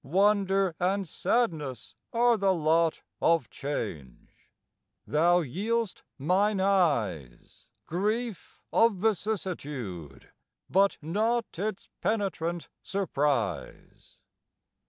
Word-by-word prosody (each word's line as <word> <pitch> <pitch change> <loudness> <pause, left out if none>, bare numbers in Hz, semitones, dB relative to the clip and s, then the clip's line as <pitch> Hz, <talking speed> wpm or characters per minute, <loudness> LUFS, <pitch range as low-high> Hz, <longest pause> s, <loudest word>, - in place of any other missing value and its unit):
Wonder 195 +2 +2
and 190 +2 0
sadness 155 - -1 0.2
are 240 0 +4
the 195 -3 +2
lot 160 0 +2 0.2
Of 165 -6 +2
change: 90 - -6 0.6
thou 175 +4 +3
yield'st 210 - -2 0.2
mine 190 +8 +2
eyes 120 - 0 0.2
Grief 215 +5 -2
of 230 -2 +5
vicissitude, 150 - -3 0.4
but 195 +2 +3
not 215 +4 -1
Its 210 0 -3
penetrant 175 -6 -1
surprise. 140 - -2
180 Hz, 80 wpm, -28 LUFS, 145-205 Hz, 0.6 s, of